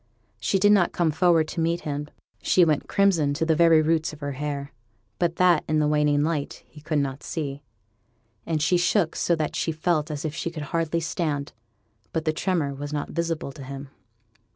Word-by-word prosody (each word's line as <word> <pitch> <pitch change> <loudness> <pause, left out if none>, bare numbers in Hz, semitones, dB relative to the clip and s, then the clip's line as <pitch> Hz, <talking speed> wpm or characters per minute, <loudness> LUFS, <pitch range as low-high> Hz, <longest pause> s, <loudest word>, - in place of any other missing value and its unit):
She 195 - +1
did 205 +2 +4
not 195 -4 +4
come 170 -3 +1
forward 165 0 +3
to - - -5
meet 165 +1 0
him; 145 0 -4 0.3
she 180 - +4
went 155 -3 0
crimson 170 -8 +2
to 160 +2 0
the 160 -1 +2
very 165 -1 +5
roots 160 0 +1
of 150 - -11
her 145 -1 -4
hair; 140 0 -4 0.5
but 170 -1 +1
that, 175 -3 +4
in 155 - +1
the 150 -1 +2
waning 150 -1 +2
light, 155 -2 -2
he 150 - -15
could 155 0 -1
not 140 -1 -2
see; 140 -3 -4 0.8
and 155 -3 -1
she 180 +3 +3
shook 175 0 +1
so 170 - +1
that 155 -2 -2
she 165 - 0
felt 155 -1 0
as 150 0 -4
if 155 - -2
she 170 +1 -3
could 160 -3 -6
hardly 165 0 0
stand; 155 -3 -2 0.6
but 160 0 -2
the 155 - +1
tremor 160 -5 -1
was 145 +1 -6
not 150 -1 -3
visible 165 -4 -2
to 140 0 -10
him. 135 +1 -8
155 Hz, 200 wpm, -25 LUFS, 145-170 Hz, 0.8 s, very